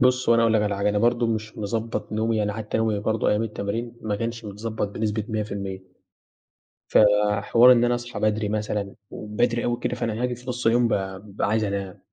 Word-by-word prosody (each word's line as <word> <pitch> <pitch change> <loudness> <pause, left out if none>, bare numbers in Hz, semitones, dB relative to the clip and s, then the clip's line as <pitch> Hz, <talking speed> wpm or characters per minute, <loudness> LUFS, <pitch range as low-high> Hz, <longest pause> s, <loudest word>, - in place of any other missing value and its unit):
بُص 125 0 +3
هو 115 - +6
أنا 115 - +4
هاقول 115 -1 +3
لك 105 - +3
على 105 -1 0
حاجة 100 +1 +1
أنا 105 0 +1
برضه 120 +1 +2
مش 110 -1 -3
مضبّط 110 +2 -3
نومي 110 +1 0
يعني 105 -1 0
حتّى 110 +1 -3
نومي 110 -2 +1
برضه 110 +2 0
أيام 105 +2 +2
التمارين 115 +2 -4
ما 105 -2 -1
كنش 115 +1 -4
متضبّط 105 +1 -4
بنسبة 105 0 -2
100%. 100 -3 -4 1.1
ف - - +2 0.4
حوار 120 +4 +6
إن 120 -1 +5
أنا 120 0 +2
أصحى 120 +1 -6
بدري 110 -1 +1
مثلًا 105 -2 -2 0.2
وبدري 115 +3 -1
أوي 120 0 -1
كده 125 - -1
فأنا 115 -1 -2
هاجي 125 -1 0
في 125 +1 -10
نُص 125 0 -4
اليوم 120 +1 +4
بقي 95 -3 -2
بابقى 100 -1 -3
عايز 110 0 +1
أنام. 100 -2 -3
110 Hz, 210 wpm, -24 LUFS, 105-115 Hz, 1.1 s, هو